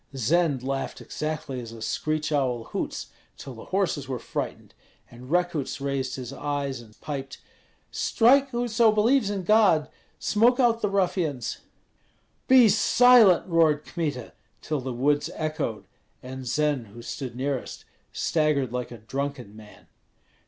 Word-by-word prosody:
Zend 145 +1 +1
laughed 135 0 -3
exactly 150 -4 -4
as 115 -1 -9
a 115 - -10
screech 155 +8 -2
owl 130 -5 0
hoots, - - -5 0.3
till 135 - -9
the 115 - -11
horses 180 -8 -1
were 130 -2 -3
frightened; - - -6 0.4
and 125 +2 -12
Rekuts 175 -5 -1
raised 135 -2 -2
his 130 0 -7
eyes 140 -3 -3
and 110 -2 -18
piped, 135 -2 -6 0.5
"Strike, 270 +4 +3
whoso 235 -2 +2
believes 220 +2 +3
in 200 -2 -3
God! 180 -7 +4 0.3
smoke 235 +4 +2
out 235 -2 +3
the 210 - +1
ruffians!" 175 - -1 0.9
"Be 255 -3 +7
silent!" 225 -1 +5
roared 160 -4 +2
Kmita, 145 -8 -4 0.3
till 150 -3 -2
the 130 0 -4
woods 145 +4 +1
echoed, 155 -9 -3 0.4
and 130 0 -7
Zend, 145 -3 0
who 115 +4 -12
stood 130 -3 -6
nearest, 135 +1 -4 0.3
staggered 150 -6 0
like 125 -1 -3
a 120 - -9
drunken 130 -1 -5
man. 110 -1 -15
145 Hz, 140 wpm, -26 LUFS, 130-185 Hz, 0.9 s, Be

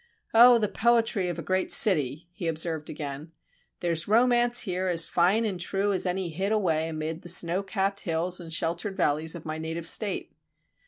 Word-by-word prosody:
Oh, 240 +2 +7
the 215 -2 0
poetry 225 -3 +1
of 175 -2 -4
a 165 - -6
great 185 0 -1
city!" 155 - +3
he 175 -2 -6
observed 160 -1 -1
again. 145 +1 -7 0.5
"There's 170 -2 0
romance 240 +2 +3
here 185 -3 -3
as 165 -2 +2
fine 190 +6 +2
and 195 -4 -3
true 195 +3 -1
as 185 - 0
any 180 0 -2
hid 190 +6 -3
away 165 -7 0
amid 160 +1 -5
the 175 - -5
snowcapped 195 +3 +1
hills 175 +1 -2
and 165 -2 -10
sheltered 170 +5 -3
valleys 160 -1 0
of 170 - -10
my 155 0 -5
native 160 +1 -5
state. 205 +2 0
175 Hz, 175 wpm, -26 LUFS, 160-200 Hz, 0.5 s, Oh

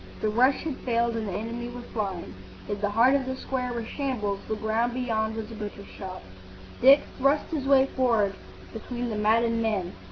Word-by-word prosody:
The 215 - 0
rush 255 +5 +3
had 310 -5 -3
failed 235 -1 0
and 220 -2 -2
the - - -3
enemy 230 +4 -4
were 240 0 -8
flying. 190 - -3 0.3
If 205 0 -3
the 205 - +1
heart 230 +6 +5
of 270 -2 +1
the 260 - -2
square 255 -1 -3
were 235 -2 -3
shambles, 220 -7 -2
the 220 - -1
ground 220 +3 0
beyond 220 -3 -1
was 225 0 -5
a - - -7
butcher's 205 -2 -7
shop. 185 -2 -8 0.6
Dick 275 +3 +8 0.2
thrust 275 +3 +3
his 285 -4 -2
way 270 -1 +6
forward 230 -6 +2 0.4
between 240 +2 -4
the - - -2
maddened 230 +2 +2
men. 205 -6 -1
230 Hz, 195 wpm, -27 LUFS, 210-255 Hz, 0.6 s, Dick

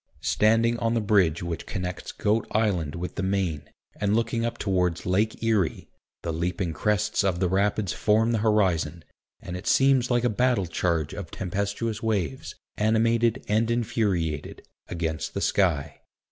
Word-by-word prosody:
Standing 115 +2 +3
on 115 0 0
the - - +2
bridge 95 -7 +2
which 85 -1 -5
connects 90 -3 -4
Goat 105 +2 0
Island 95 -9 0
with 90 +1 -5
the - - -4
Main, 95 -5 -1 0.3
and 105 0 +1
looking 115 0 0
up 115 - -2
towards 90 -4 0
Lake 105 +5 0
Erie, 110 -7 0 0.3
the 85 - -2
leaping 85 +1 -2
crests 105 +3 0
of 95 -3 0
the 95 - +2
rapids 100 +1 +1
form 110 +2 +2
the 115 - +1
horizon, 95 -6 +1 0.4
and 90 - -6
it 90 - -7
seems 135 -2 +4
like 120 -1 +2
a - - +4
battle 120 -2 +1
charge 85 -2 -1
of - - -6
tempestuous 100 +4 -3
waves, 95 -12 -2 0.2
animated 115 +2 +2
and 110 +2 +1
infuriated, 100 -10 -1 0.3
against 80 -2 -3
the - - 0
sky. 80 -7 +1
100 Hz, 155 wpm, -26 LUFS, 85-115 Hz, 0.4 s, seems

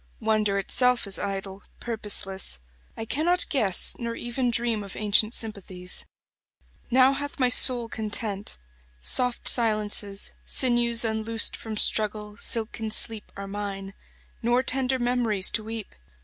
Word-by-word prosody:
Wonder 215 -3 0
itself 250 +5 +3
is 200 -1 +1
idle, 195 -1 -5 0.2
purposeless; 205 - -1 0.4
I 225 - -5
cannot 340 +9 +1
guess 210 - +2
Nor 235 -1 -4
even 240 +2 -3
dream 230 -2 -1
of 195 - -10
ancient 215 +2 +2
sympathies. 190 -5 -1 0.8
Now 260 +2 +4
hath 285 +1 -6
my 255 -3 +2
soul 245 -1 +5
content. 210 -2 -4 0.4
Soft 250 - +2
silences, 210 -3 +1
Sinews 240 -2 +1
unloosed 225 +1 +1
from 220 -1 -7
struggle, 210 -1 0
silken 225 0 0
sleep, 215 0 +2
27 200 - -7
Are - - -8
mine; 195 -1 -6 0.5
nor 240 +2 +1
tender 260 0 -1
memories 240 -5 +1
to 215 - -1
weep. 220 -1 -7
220 Hz, 130 wpm, -25 LUFS, 205-240 Hz, 0.8 s, soul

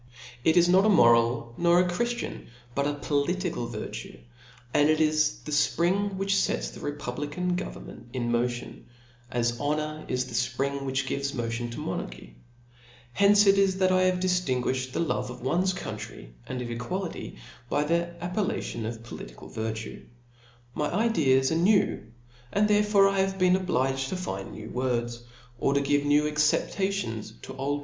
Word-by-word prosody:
It 160 +4 +4
is 175 0 +6
not 185 +2 +5
a 215 - +4
moral, 115 - +4
nor 170 0 +5
a 180 - +3
chri/iian, 240 +7 -3 0.3
but 140 +2 0
a 145 - -1
political 145 -1 -1
y\xi\i6 - - -5 0.3
^ 60 - -15 0.5
and 145 +1 +4
it 155 0 +3
is 155 -1 +2
the 150 - -5
fpring 185 +7 +1
which 195 +1 0
fets - - 0
the - - -11
republican' 145 +5 -3
govern 185 - -5
^ - - -13
ment - - -11
in 120 -2 -2
motion, 120 +1 -2 0.4
as 120 0 0
honour 155 +1 -2
is 125 0 -1
the - - -10
fprihg 135 +3 -1
whiib 135 0 -1
^ives 140 0 -3
motion 120 0 -2
to 120 - -7
monarchy, - - -5 0.8
tience 205 +1 +6
it 195 0 +5
is, 195 -1 +3
that 185 -1 +3
I 185 0 +4
have 185 -1 +2
dijiinguijhed 130 -8 0
the - - -1
love 165 - -1
of 125 0 -9
one's 175 +8 +2
coutitry^ 105 - -7 0.2
and 125 - -4
qf 120 -1 -4
equality, 165 - -4 0.3
by 145 - +1
the 170 +3 +1
appellation 180 - -2
of 115 0 -6
political - - -10
virtue. 110 0 -5 0.7
My 150 +2 -1
ideas 160 - +3
are - - +1
new, 195 +4 +3 0.5
and 210 +1 +3
therefore 210 -1 +4
1 195 - +3
have 195 0 +1
been 185 -1 +4
obliged 135 -7 0
to - - -2
fnd 180 - -3
out 95 - -8
ne,w 110 +1 -8
words, 120 -2 -1 0.4
or 140 - +1
to 140 - +3
give 145 +1 +1
new 145 +1 +4
acceptations 150 - 0
to - - -8
old. 140 +2 -1
145 Hz, 170 wpm, -27 LUFS, 120-180 Hz, 0.8 s, is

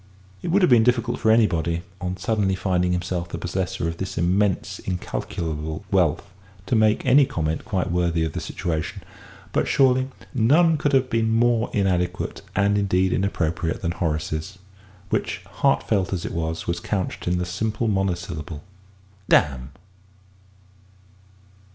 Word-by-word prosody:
It - - -5
would 185 +3 +3
have - - +5
been 120 -2 +7
difficult 120 0 +1
for 110 - +2
anybody, 85 -7 +2 0.2
on 90 0 -3
suddenly 100 0 0
finding 90 -2 0
himself 90 -1 -2
the 85 - -5
possessor 90 0 -2
of 85 0 -3
this 95 +1 -5
immense 95 +3 +1
incalculable 80 -4 -4
wealth, - - +2 0.4
to 120 - 0
make 110 -1 +3
any 135 +3 +6
comment 80 -1 -2
quite 95 -6 -1
worthy 85 -2 +1
of 80 - -4
the - - -3
situation, 80 -3 -4 0.5
but, - - +1
surely, 130 -1 +3 0.3
none 155 +8 +4
could 145 -1 0
have 130 -1 +4
been 115 -1 +1
more 115 0 +2
inadequate 90 -3 -1
and 100 +1 +3
indeed 95 -2 +2
inappropriate 85 -3 -1
than 85 - 0
Horace's 80 +2 -3 0.5
which, - - -1 0.2
heartfelt 95 -3 +2
as 90 - -3
it - - -4
was, 80 -1 -3
was 85 0 -1
couched 95 -4 -3
in 90 0 +1
the 90 - -1
simple 110 +6 -2
monosyllable 90 -6 -2 0.7
"Damn!" 65 -3 +3
95 Hz, 145 wpm, -23 LUFS, 85-110 Hz, 0.7 s, been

